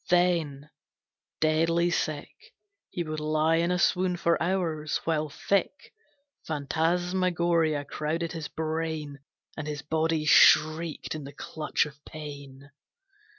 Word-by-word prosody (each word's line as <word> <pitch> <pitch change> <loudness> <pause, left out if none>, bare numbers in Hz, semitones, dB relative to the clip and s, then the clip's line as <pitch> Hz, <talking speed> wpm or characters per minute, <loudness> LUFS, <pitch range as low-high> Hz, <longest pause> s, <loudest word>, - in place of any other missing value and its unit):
Then, 165 -5 +1 0.7
deadly 165 +2 +2
sick, 155 -4 -2 0.6
He 175 - -3
would 155 -1 -4
lie 155 +1 +2
in 170 +1 +1
a 180 - +1
swoon 180 0 +2
for 170 0 +1
hours, 165 -4 -1
while 155 -2 0
thick 200 - -1 0.5
Phantasmagoria 170 0 0
crowded 160 +3 -3
his 160 -3 -5
brain, 160 -2 -3 0.4
And 155 -1 -5
his 150 -1 -4
body 160 0 0
shrieked 155 +1 +4
in 155 -1 -6
the 140 +1 -9
clutch 155 -1 -1
of 150 0 -12
pain. 140 -2 -10
160 Hz, 115 wpm, -27 LUFS, 150-170 Hz, 0.7 s, shrieked